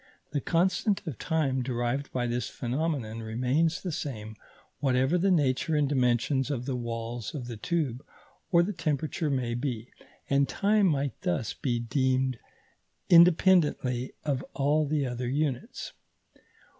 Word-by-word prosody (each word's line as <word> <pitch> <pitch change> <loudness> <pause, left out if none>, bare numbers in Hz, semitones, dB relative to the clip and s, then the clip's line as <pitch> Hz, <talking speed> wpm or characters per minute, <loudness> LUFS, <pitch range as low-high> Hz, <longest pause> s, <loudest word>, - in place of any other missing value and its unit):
The 145 -1 -1
constant 185 - +1
of 150 -9 -5
time 140 -5 0
derived 120 +2 -2
by 125 -1 -1
this 120 0 -2
phenomenon 125 -3 -2
remains 125 +9 0
the 180 - -2
same 110 -8 -5 0.4
whatever 130 +3 +2
the 185 +3 +2
nature 150 -2 +2
and 150 -1 +3
dimensions 130 0 +1
of 125 -4 -2
the 135 -1 -2
walls 120 +1 -4
of 130 -4 -4
the 120 -1 -6
tube 135 0 -2 0.5
or 170 -1 +5
the 205 +4 -2
temperature 155 -1 -1
may 125 -4 -1
be, 120 -2 -3 0.4
and 140 0 +2
time 205 0 +3
might 140 -6 -1
thus 95 +5 -1
be 120 -3 -1
denned 130 +1 0 0.7
independently 165 -7 +4
of 135 -3 0
all 150 +2 +2
the 145 -1 0
other 125 -1 -3
units. 140 -2 -2
135 Hz, 140 wpm, -28 LUFS, 120-155 Hz, 0.7 s, or